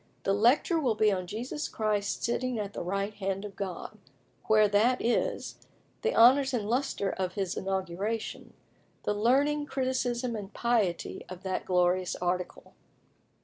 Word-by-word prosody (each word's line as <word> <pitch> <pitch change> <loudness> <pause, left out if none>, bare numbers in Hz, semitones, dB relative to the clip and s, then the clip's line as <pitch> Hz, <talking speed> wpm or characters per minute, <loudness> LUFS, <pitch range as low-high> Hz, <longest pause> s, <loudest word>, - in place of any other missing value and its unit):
"The 195 - +2
lecture 245 - +3
will 250 -7 +1
be 215 0 +3
on 185 -2 -2
Jesus 245 - -4
Christ's 210 -2 -1
sitting 250 +1 -1
at 205 -1 -4
the - - -4
right 195 +3 -2
hand 195 0 -3
of 200 -2 -8
God; 190 -3 -6 0.5
where 215 -1 +5
that 220 +5 +3
is; 235 - -1 0.4
the 460 - 0
honours 260 +3 +6
and 210 -4 -2
lustre 240 -4 0
of 185 -1 -3
his 190 -2 -2
inauguration; 195 +3 -3 0.5
the - - 0
learning, 280 +7 +2
criticism, 255 -3 -1
and 205 -2 -6
piety 220 -8 0
of 185 0 -9
that 190 -1 -2
glorious 180 0 +2
article. 180 0 -3
210 Hz, 145 wpm, -29 LUFS, 190-245 Hz, 0.5 s, honours